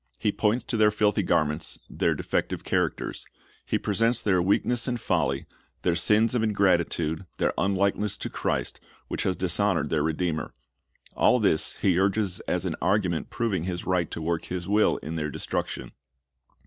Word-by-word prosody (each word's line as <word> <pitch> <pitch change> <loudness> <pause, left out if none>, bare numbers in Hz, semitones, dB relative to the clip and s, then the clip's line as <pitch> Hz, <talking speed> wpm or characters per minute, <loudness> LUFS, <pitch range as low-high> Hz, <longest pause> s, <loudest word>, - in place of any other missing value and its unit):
He 105 - +1
points 110 +4 +1
to 115 - -2
their 105 -1 +5
filthy 105 -1 +2
garments, 75 +1 0
their - - 0
defective - - -2
characters. - - -1 0.4
He - - +1
presents 115 +3 +1
their 95 -5 +2
weakness 115 +6 +2
and 120 -1 -1
folly, 75 -9 0 0.4
their 90 -2 +2
sins 105 +6 +3
of 120 - +1
ingrati 100 -5 +2
tude, 80 +3 -3
their - - +1
unlikeness 100 +1 0
to - - -4
Christ, - - -2 0.3
which - - -2
has 95 - 0
dishonored 95 0 +1
their 80 - +2
Redeemer. 80 +1 -2 0.6
All 125 - +4
this 95 -8 +1
he 90 -2 +3
urges 95 -1 +1
as - - 0
an - - -2
argument 95 -5 +1
proving 100 -8 -1
his 90 -1 -4
right 90 -3 +1
to 80 - -5
work 85 0 -1
his 90 0 -4
will 105 +2 +3
in 80 +3 -4
their 75 -1 -2
destruction. - - -3
95 Hz, 165 wpm, -26 LUFS, 85-105 Hz, 0.6 s, their